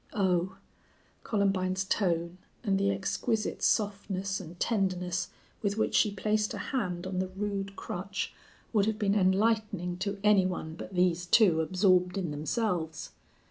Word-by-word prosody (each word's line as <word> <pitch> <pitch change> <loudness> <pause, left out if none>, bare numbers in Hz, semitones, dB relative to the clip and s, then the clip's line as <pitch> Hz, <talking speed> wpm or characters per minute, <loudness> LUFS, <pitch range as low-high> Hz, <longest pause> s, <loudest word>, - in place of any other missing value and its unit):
"Oh!" 185 -3 +1 0.7
Columbine's 190 -3 +1
tone, 175 -3 0 0.2
and 195 -4 +1
the 200 0 +2
exquisite 210 +3 -1
softness 200 -2 0
and 175 -1 -10
tenderness 185 -4 0 0.3
with 205 0 -1
which 220 - +1
she 215 - +4
placed 210 +1 0
a - - -5
hand 180 -8 -1
on 185 -1 -2
the 185 - 0
rude 195 +1 -4
crutch 195 +2 -4 0.4
would 210 -2 +3
have 220 -1 0
been 205 -2 +1
enlightening 200 -2 +1
to 200 +2 -2
any 205 -3 +5
one 160 -3 -4
but 175 +3 -8
these 180 -1 +2
two 175 -5 +5
absorbed 185 +1 +2
in 180 -5 -2
themselves. 160 +1 -2
190 Hz, 140 wpm, -30 LUFS, 180-205 Hz, 0.7 s, any